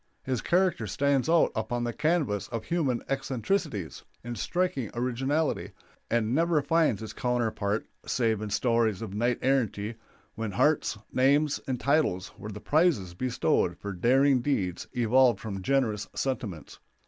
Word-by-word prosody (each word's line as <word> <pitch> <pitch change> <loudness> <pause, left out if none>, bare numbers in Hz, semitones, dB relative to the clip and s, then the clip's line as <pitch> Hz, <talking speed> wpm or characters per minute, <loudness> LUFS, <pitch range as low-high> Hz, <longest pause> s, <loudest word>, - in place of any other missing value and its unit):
His 130 -2 -2
character 175 - +1
stands 140 +6 +1
out 165 0 +4
upon 120 +2 -2
the 120 -1 -2
canvas 145 - 0
of 115 -2 -5
human 145 -9 0
eccentricities 135 - -2 0.2
in 120 +1 -5
striking 140 - -1
originality, 130 +6 -1 0.4
and 115 0 +1
never 165 0 +2
finds 155 -10 +2
its 110 - -7
counterpart 115 -4 -1 0.2
save 115 -4 +1
in 105 - -4
stories 115 -1 +1
of 100 -3 -6
knight 120 +3 +1
errantry, 115 -5 0 0.4
when 110 -3 -4
hearts, 150 +9 +2 0.2
names, 140 +3 +3
and 130 -2 -2
titles 140 - +1
were 105 - -8
the 105 - -7
prizes 145 - +2
bestowed 125 +7 0
for 100 -1 -6
daring 130 +7 +3
deeds 100 -10 -1
evolved 120 -1 +4
from 100 -3 -5
generous 110 -3 0
sentiments. 110 - -4
120 Hz, 140 wpm, -28 LUFS, 110-140 Hz, 0.4 s, out